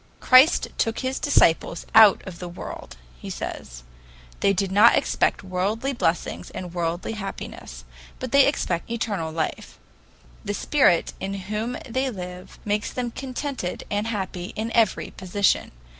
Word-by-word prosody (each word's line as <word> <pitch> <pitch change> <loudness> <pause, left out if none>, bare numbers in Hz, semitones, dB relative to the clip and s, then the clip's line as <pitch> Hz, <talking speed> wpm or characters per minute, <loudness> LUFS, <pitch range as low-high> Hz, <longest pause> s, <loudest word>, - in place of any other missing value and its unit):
Christ 255 +5 +6
took 225 0 0
his 260 0 -2
disciples 170 - +2
out 220 -2 +7
of 180 -3 -9
the 180 - -6
world, 65 - -9 0.2
he - - -8
says. - - -6 0.6
They 200 - +3
do 195 0 0
not 205 +5 +6
expect - - +1
worldly 200 +8 -1
blessings 175 -8 -1
and 180 -2 -7
worldly 170 +2 -2
happiness, 195 - -7 0.3
but 255 - -6
they 280 -1 +6
expect 180 - -1
eternal 205 -8 -2
life. 160 0 -4 0.7
The 205 - -3
Spirit 265 - +2
in 195 +1 -4
whom 210 +5 -3
they 260 +3 -1
live 180 -4 -8
makes 210 0 -1
them 245 -2 -3
contented 260 -6 -4
and 205 +2 -1
happy 190 -4 -4
in 225 +1 -3
every 230 -2 +1
position. 190 +2 0
205 Hz, 145 wpm, -24 LUFS, 180-235 Hz, 0.7 s, out